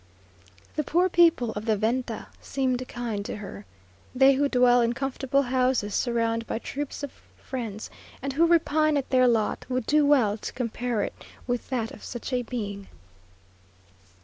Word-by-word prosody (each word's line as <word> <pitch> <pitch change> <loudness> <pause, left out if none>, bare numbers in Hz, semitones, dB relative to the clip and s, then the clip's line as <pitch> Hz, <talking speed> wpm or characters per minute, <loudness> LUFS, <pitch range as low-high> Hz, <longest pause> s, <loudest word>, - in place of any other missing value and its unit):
The 305 - +1
poor 355 +5 +2
people 335 -10 +4
of 210 0 -6
the 220 -2 +2
venta 230 +2 -1 0.2
seemed 255 -2 -1
kind 230 -4 -4
to - - -5
her. 185 - -9 0.5
They 270 +2 +6
who 285 +1 +1
dwell 245 -1 +5
in 235 0 +2
comfortable 270 +1 0
houses, 255 -5 +1
surrounded 230 -1 0
by - - -2
troops 285 +4 -5
of 285 - -4 0.3
friends, 225 -5 -6 0.3
and 275 +1 -3
who 330 +4 +4
repine 310 -2 +3
at 275 - -3
their 255 -1 +5
lot, 225 -3 +1
would 255 -2 -1
do 300 0 +4
well 255 -8 +3
to - - -6
compare 240 -2 -2
it - - -4 0.3
with 245 -1 -3
that 235 -4 -2
of - - -12
such 240 +2 -6
a 250 - +2
being. 205 -5 -5
250 Hz, 165 wpm, -26 LUFS, 230-275 Hz, 0.5 s, They